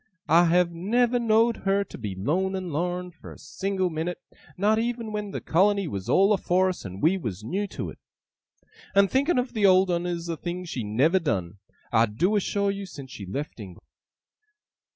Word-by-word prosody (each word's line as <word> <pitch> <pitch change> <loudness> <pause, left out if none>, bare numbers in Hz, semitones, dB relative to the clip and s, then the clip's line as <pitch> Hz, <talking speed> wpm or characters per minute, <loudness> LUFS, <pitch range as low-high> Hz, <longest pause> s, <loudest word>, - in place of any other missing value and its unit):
I 170 +3 +6
have 175 +1 +3
never 235 +8 +1
know'd 230 0 +3
her 195 +1 +1
to - - -12
be 105 -5 -5
lone 180 - 0
and 185 -4 -4
lorn, 180 +3 -2
for 160 - -13
a - - -12
single 190 +4 -2
minute, 165 +3 -3 0.4
not 210 +3 +3
even 230 -1 -2
when 210 -1 -3
the - - -5
colony 195 +2 +2
was 100 -9 -5
all 195 +2 +5
afore 185 -1 +2
us, 185 - -5
and 95 0 -8
we 185 +5 +3
was 105 - -5
new 195 - -2
to - - -5
it. - - -15 1.0
And 200 0 +5
thinking 280 +4 +2
of 250 +1 -1
the 210 -3 +3
old 185 0 +5
'un 175 0 -1
is 170 -1 -3
a 165 - -2
thing 180 +2 -5
she 130 -8 -4
never 135 - +2
done, 100 - -2 0.3
I 115 +1 +4
do 175 - 0
assure 200 0 +1
you, 200 0 -6
since 140 -6 -10
she 100 -7 -8
left 140 +7 -5
England! 95 -5 -11
180 Hz, 195 wpm, -26 LUFS, 150-200 Hz, 1.0 s, I